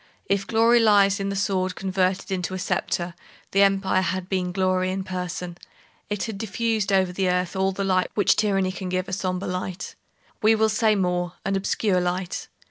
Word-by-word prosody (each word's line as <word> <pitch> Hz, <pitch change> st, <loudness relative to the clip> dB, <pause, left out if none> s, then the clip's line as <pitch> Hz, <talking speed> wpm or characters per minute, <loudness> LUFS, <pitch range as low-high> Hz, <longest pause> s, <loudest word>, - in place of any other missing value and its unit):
If 200 Hz, 0 st, 0 dB
glory 230 Hz, +1 st, +4 dB
lies 205 Hz, -3 st, +4 dB
in 195 Hz, 0 st, -2 dB
the 200 Hz, -, -3 dB
sword 185 Hz, -2 st, 0 dB
converted 190 Hz, 0 st, -1 dB
into 185 Hz, 0 st, -2 dB
a -, -, -3 dB
sceptre, 175 Hz, -1 st, -2 dB, 0.4 s
the 195 Hz, -, +3 dB
Empire 195 Hz, -1 st, +3 dB
had 185 Hz, 0 st, -2 dB
been 185 Hz, -2 st, -1 dB
glory 185 Hz, 0 st, +1 dB
in 190 Hz, +1 st, -2 dB
person. 180 Hz, -1 st, -5 dB, 0.5 s
It 205 Hz, -1 st, -2 dB
had 220 Hz, -4 st, -5 dB
diffused 220 Hz, -2 st, -1 dB
over 190 Hz, -2 st, +2 dB
the 185 Hz, 0 st, 0 dB
earth 180 Hz, 0 st, 0 dB
all 190 Hz, 0 st, +1 dB
the 195 Hz, +1 st, -3 dB
light 185 Hz, -1 st, +1 dB
which 205 Hz, -, +4 dB
tyranny 195 Hz, -3 st, +1 dB
can 185 Hz, 0 st, -6 dB
give—a 185 Hz, +1 st, -2 dB
sombre 185 Hz, 0 st, -2 dB
light. 185 Hz, +2 st, -4 dB, 0.5 s
We 220 Hz, +1 st, +5 dB
will 220 Hz, 0 st, +3 dB
say 215 Hz, 0 st, +2 dB
more; 180 Hz, -2 st, 0 dB
an 195 Hz, 0 st, 0 dB
obscure 195 Hz, -1 st, +1 dB
light. 180 Hz, 0 st, -3 dB
190 Hz, 185 wpm, -24 LUFS, 185-200 Hz, 0.5 s, We